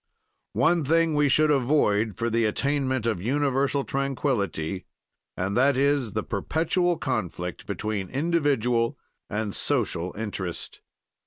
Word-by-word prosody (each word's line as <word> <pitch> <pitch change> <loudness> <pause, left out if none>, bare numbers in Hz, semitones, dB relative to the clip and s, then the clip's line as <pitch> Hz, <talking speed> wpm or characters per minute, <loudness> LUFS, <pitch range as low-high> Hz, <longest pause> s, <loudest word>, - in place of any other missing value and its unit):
"One 170 -1 +3
thing 165 +2 +2
we 145 -1 +3
should 155 +3 +4
avoid, 120 - +2
for 115 0 -1
the 115 0 +2
attainment 130 +1 0
of 110 -7 0
universal 140 +3 +1
tranquility, 120 - -2 0.5
and 95 +2 -1
that 135 +2 +4
is 140 -5 +1
the 110 - -1
perpetual 165 - 0
conflict 90 - -3
between 105 -3 -3
individual 140 -5 +1 0.3
and 105 -1 -2
social 95 -10 0
interest. 100 -5 -5
130 Hz, 115 wpm, -26 LUFS, 105-145 Hz, 0.5 s, should